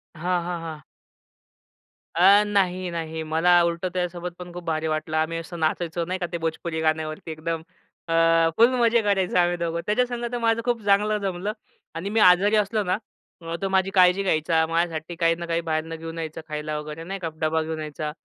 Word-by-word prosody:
हां, 175 Hz, +2 st, 0 dB
हां, 175 Hz, -1 st, -4 dB
हां. 160 Hz, -3 st, -7 dB, 1.3 s
अ, 195 Hz, +4 st, +7 dB
नाही, 185 Hz, -3 st, 0 dB
नाही. 160 Hz, -1 st, -4 dB
मला 160 Hz, +3 st, +2 dB
उलटं 170 Hz, +2 st, -1 dB
त्यासोबत 180 Hz, -1 st, -3 dB
पण 180 Hz, -1 st, -8 dB
खूप 175 Hz, 0 st, -7 dB
भारी 160 Hz, -1 st, -1 dB
वाटलं. 155 Hz, 0 st, -2 dB
आम्ही 160 Hz, +1 st, 0 dB
असं 165 Hz, +1 st, -7 dB
नाचायचो 165 Hz, +1 st, -1 dB
नाही 185 Hz, +2 st, -3 dB
का? 180 Hz, -, -1 dB
ते 170 Hz, -, -2 dB
भोजपुरी 160 Hz, 0 st, -3 dB
गाण्यावरती 155 Hz, 0 st, -1 dB
एकदम. 160 Hz, +1 st, -3 dB, 0.5 s
अ, 165 Hz, -, -1 dB, 0.4 s
फुल 230 Hz, +2 st, +7 dB
मजे 235 Hz, 0 st, +4 dB
करायचो 195 Hz, -4 st, +1 dB
आम्ही 175 Hz, 0 st, +2 dB
दोघं. 170 Hz, -1 st, -2 dB
त्याच्यासंग 240 Hz, +2 st, 0 dB
तर 245 Hz, -, -2 dB
माझं 230 Hz, -1 st, +1 dB
खूप 240 Hz, -2 st, 0 dB
चांगलं 205 Hz, +1 st, +3 dB
जमलं 195 Hz, +1 st, -2 dB, 0.4 s
आणि 175 Hz, +5 st, -4 dB
मी 220 Hz, +2 st, +1 dB
आजारी 195 Hz, +2 st, +6 dB
असलो 210 Hz, 0 st, +1 dB
ना, 180 Hz, -1 st, 0 dB, 0.4 s
अ, 165 Hz, 0 st, -4 dB
तो 195 Hz, -, -1 dB
माझी 190 Hz, 0 st, +2 dB
काळजी 180 Hz, +2 st, +5 dB
घ्यायचा, 160 Hz, -2 st, +2 dB
माझ्यासाठी 165 Hz, 0 st, -2 dB
काही 165 Hz, -1 st, +2 dB
ना 170 Hz, 0 st, -6 dB
काही 170 Hz, 0 st, -1 dB
बाहेरून 155 Hz, +1 st, -2 dB
घेऊन 165 Hz, +1 st, -7 dB
यायचं 160 Hz, -1 st, -5 dB
खायला 150 Hz, 0 st, -3 dB
वगैरे 150 Hz, +2 st, -7 dB
नाही 195 Hz, +3 st, -5 dB
का. 170 Hz, -3 st, -3 dB
डबा 160 Hz, 0 st, +1 dB
घेऊन 160 Hz, 0 st, -4 dB
यायचा, 150 Hz, 0 st, -4 dB
170 Hz, 190 wpm, -24 LUFS, 160-190 Hz, 1.3 s, अ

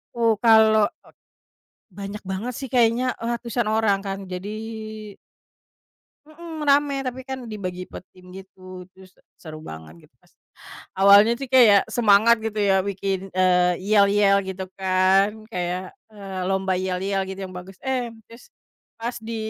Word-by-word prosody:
Oh 230 Hz, -1 st, +2 dB
kalau 220 Hz, -2 st, +5 dB, 1.1 s
banyak 200 Hz, +2 st, -8 dB
banget 190 Hz, +6 st, -4 dB
sih 270 Hz, -, -6 dB
kayaknya, 240 Hz, 0 st, +3 dB, 0.2 s
eee, 230 Hz, -, -4 dB
ratusan 235 Hz, -1 st, -3 dB
orang 215 Hz, -2 st, +2 dB
kan 195 Hz, 0 st, -4 dB
jadi 180 Hz, +2 st, -5 dB, 1.8 s
Mhm, 320 Hz, +1 st, -10 dB
rame 285 Hz, 0 st, +3 dB
tapi 255 Hz, +1 st, -4 dB
kan 260 Hz, -2 st, -6 dB
dibagi 185 Hz, -5 st, -6 dB
per -, -, -10 dB
tim 180 Hz, 0 st, -16 dB
gitu, 185 Hz, -1 st, -12 dB
terus 190 Hz, 0 st, -18 dB, 0.3 s
seru 155 Hz, -2 st, -10 dB
banget 80 Hz, -, -12 dB
gitu. -, -, -46 dB, 0.8 s
Awalnya 200 Hz, +3 st, +7 dB
sih 275 Hz, -, -5 dB
kayak 230 Hz, -6 st, +5 dB
semangat 225 Hz, 0 st, +4 dB
gitu 220 Hz, -1 st, -3 dB
ya 195 Hz, -2 st, +2 dB
bikin, 195 Hz, -1 st, -4 dB
eee, 180 Hz, -1 st, +2 dB
yel-yel 200 Hz, 0 st, +3 dB
gitu 190 Hz, 0 st, -6 dB
kan 190 Hz, +1 st, +3 dB, 0.2 s
kayak, 180 Hz, 0 st, -4 dB, 0.2 s
eee, 195 Hz, -3 st, -8 dB
lomba 190 Hz, 0 st, 0 dB
yel-yel 190 Hz, +1 st, -2 dB
gitu 190 Hz, 0 st, -7 dB
yang 185 Hz, -, -12 dB
bagus, 180 Hz, +1 st, -10 dB
eh, 255 Hz, -3 st, -2 dB, 0.2 s
terus, 235 Hz, -, -16 dB, 0.5 s
pas 235 Hz, +2 st, -4 dB
di 225 Hz, +1 st, -7 dB
200 Hz, 140 wpm, -23 LUFS, 185-230 Hz, 1.8 s, Awalnya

